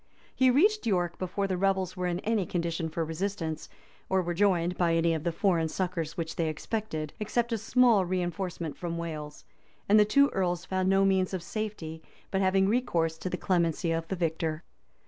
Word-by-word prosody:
[] - - -28
He 260 -1 +4
reached 400 - +3
York 175 -4 0
before 190 +2 -2
the 190 -2 -1
rebels 190 -1 +1
were 180 -1 -2
in 175 +1 -2
any 220 -2 +1
condition 170 -2 -2
for 165 +1 -2
resistance, 165 -1 -3 0.4
or 190 -1 +2
were 175 0 -2
joined 180 -2 +2
by 170 -2 +2
any 165 0 +2
of 160 -2 -3
the 170 - 0
foreign 165 -2 +1
succors 170 -2 -3
which 165 -1 -4
they 165 - +1
expected, 155 -2 -4
except 235 +3 -1
a - - +1
small 230 -2 +4
reënforcement 175 -3 -3
from 170 -1 -4
Wales;[] 155 -3 -6 0.4
and 210 +2 +6
the - - +8
two 280 +7 +4
earls 180 -2 -1
found 185 0 0
no 195 0 +4
means 190 -1 +2
of 180 - -5
safety 185 -6 -5 0.3
but 190 - +1
having 190 0 +3
recourse 175 -8 +1
to 185 - -3
the 180 - -3
clemency 170 -3 +1
of 165 0 -1
the 190 - -2
victor. 160 -2 -2
180 Hz, 195 wpm, -29 LUFS, 165-195 Hz, 0.4 s, the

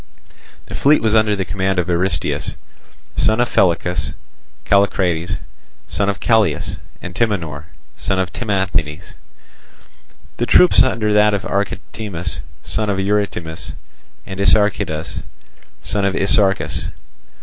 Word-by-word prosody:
The - - -10
fleet 150 +2 +4
was 110 -1 +2
under 110 -1 +4
the 95 -1 -2
command 95 0 -1
of 90 - +1
Aristeus, 90 +2 -1 0.6
son 110 +1 +2
of 120 - 0
Pellichas, 90 -1 +1 0.5
Callicrates, 90 -4 +2 0.5
son 100 +7 0
of 100 - -2
Callias, 110 -9 +1 0.3
and 90 - -6
Timanor, 85 -9 -1 0.3
son 95 -1 -1
of 95 -2 -1
Timanthes; 95 -8 -2 1.2
the 120 - -1
troops 180 +3 +6
under 110 -4 +2
that 105 0 +4
of 100 - -3
Archetimus, 100 -2 -3 0.2
son 110 -1 0
of 100 - 0
Eurytimus, 95 -5 -2 0.5
and 95 0 -7
Isarchidas, 100 -5 +1 0.6
son 100 0 -1
of 100 -1 +1
Isarchus. 100 0 +2
100 Hz, 115 wpm, -19 LUFS, 90-105 Hz, 1.2 s, troops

